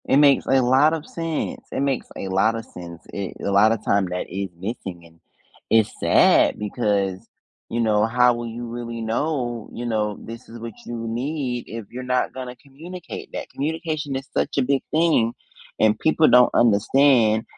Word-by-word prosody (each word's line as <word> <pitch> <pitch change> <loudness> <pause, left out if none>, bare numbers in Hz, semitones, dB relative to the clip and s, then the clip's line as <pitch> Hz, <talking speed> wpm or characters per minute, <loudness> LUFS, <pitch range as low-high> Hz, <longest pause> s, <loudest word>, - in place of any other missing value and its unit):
It - - +4
makes 140 -2 +5
a 135 0 +4
lot 135 +5 +4
of 160 -1 -4
sense. 165 -2 -4
It - - -2
makes 140 -2 -1
a 95 - -4
lotta 110 +4 +1
sense. 85 -4 -11
Eh, 100 -2 -4
a 100 - -2
lotta 110 +3 +5
time 100 -2 +1
that 90 0 -4
is 100 0 -4
missing 95 -4 -6
and 85 0 -20 0.5
it's 110 -2 +4
sad - - +4
because, 100 -3 -1 0.5
you 115 - -2
know, 105 -2 +3
how 125 +2 +4
will 120 0 -5
you 120 +1 -6
really 120 0 -6
know, 120 0 -2
you 120 - -6
know, 105 -3 -1
this 115 +2 -10
is 115 +1 -10
what 115 0 -7
you 115 -1 -5
need 125 +1 -3
if 115 -1 -7
you're 125 +1 -6
not 125 0 0
gonna 125 -1 -7
communicate 160 +7 -10
that, - - -5
communication 155 -1 -3
is 135 +1 -5
such - - -1
a 135 - +3
big 135 +1 +1
thing 155 -8 +3 0.5
and 110 -1 +3
people 160 0 +3
don't 125 0 +6
understand 115 0 +4
120 Hz, 180 wpm, -23 LUFS, 110-135 Hz, 0.5 s, don't